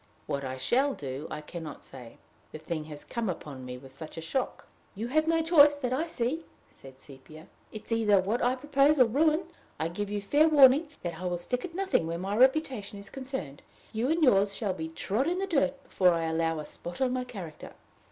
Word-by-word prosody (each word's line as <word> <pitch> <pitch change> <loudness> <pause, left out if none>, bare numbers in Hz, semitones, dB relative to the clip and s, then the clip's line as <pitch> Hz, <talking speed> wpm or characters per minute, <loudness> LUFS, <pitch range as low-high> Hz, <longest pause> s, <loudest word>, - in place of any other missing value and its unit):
What 140 0 -3
I 130 0 -4
shall 265 - +1
do 135 +2 -6
I 150 - -5
can 170 +3 -8
not 150 -3 -9
say 120 -3 -12 0.3
the - - -7
thing 155 0 -4
has 150 -1 -8
come 230 -3 -3
upon 145 -6 -6
me 125 0 -6
with 135 +1 -14
such 155 +4 -9
a - - -3
shock." 165 +12 -3 0.3
"You 225 +4 -4
have 310 +4 +2
no 330 0 +2
choice 295 -3 +6
that 255 -3 -2
I 310 +6 0
see," 290 +2 -2 0.3
said 135 -1 -15
Sepia. 145 +4 -13 0.3
"It 215 -1 -9
is - - -12
either 215 -3 +4
what 205 +6 -1
I 250 +1 +2
propose 285 +2 +3
or 255 - +7
ruin. 305 +8 +2 0.4
I 160 - -1
give 205 +4 -4
you 205 0 -2
fair 290 +11 +3
warning 285 +1 +7 0.2
that 170 -2 -4
I - - -4
will 175 0 -1
stick 250 +8 -2
at 340 -2 -9
nothing 380 - +1
where 165 0 -3
my 195 +3 -3
reputation 255 -5 +2
is 200 0 -11
concerned. 255 - -6 0.3
You 230 +4 0
and 325 +1 +2
yours 200 -6 +4
shall 205 -4 -1
be 160 -3 -5
trod 205 - -1
in 355 +2 0
the 390 - -1
dirt 280 -6 0
before 180 -2 +3
I 165 - -1
allow 165 0 0
a 150 - -5
spot 175 +3 -8
on 260 -2 +1
my 255 0 -1
character!" 185 -11 -9
210 Hz, 225 wpm, -29 LUFS, -, 0.4 s, or